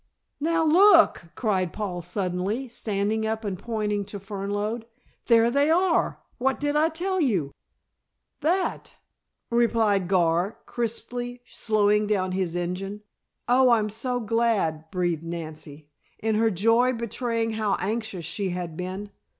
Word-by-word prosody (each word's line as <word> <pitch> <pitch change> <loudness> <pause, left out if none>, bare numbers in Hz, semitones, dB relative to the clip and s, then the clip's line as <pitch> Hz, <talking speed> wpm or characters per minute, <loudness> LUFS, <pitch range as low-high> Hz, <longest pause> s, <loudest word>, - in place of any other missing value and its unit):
"Now 325 +2 +1
look!" 335 - +6
cried 190 -7 0
Paul 185 -3 -4
suddenly, 190 +7 -2
standing 220 -2 -2
up 220 0 -3
and 190 -3 -3
pointing 210 -2 -2
to 205 0 -7
Fernlode. 205 +3 -3 0.4
"There 230 0 +5
they 280 +3 +3
are! 350 +2 +2 0.2
What 265 +1 +1
did 290 0 -1
I 310 +2 +4
tell 365 +3 -1
you!" 190 - +1 0.9
"That," 345 +5 -1 0.6
replied 225 -5 +2
Gar, 175 +1 +2
crisply, 245 +1 -4
slowing 210 -2 +1
down 190 -3 0
his 185 -2 -1
engine. 190 +4 -4 0.4
"Oh, 255 +1 +5
I'm 215 -3 +3
so 245 +3 -2
glad," 215 -9 0
breathed 175 -3 -1
Nancy, 155 -3 -8 0.3
in 220 0 -1
her 225 +1 +3
joy 230 +6 +3
betraying 230 0 -2
how 215 -2 0
anxious 215 -4 -3
she 195 +4 -2
had 175 -2 -4
been. 185 +4 -5
215 Hz, 130 wpm, -25 LUFS, 185-240 Hz, 0.9 s, look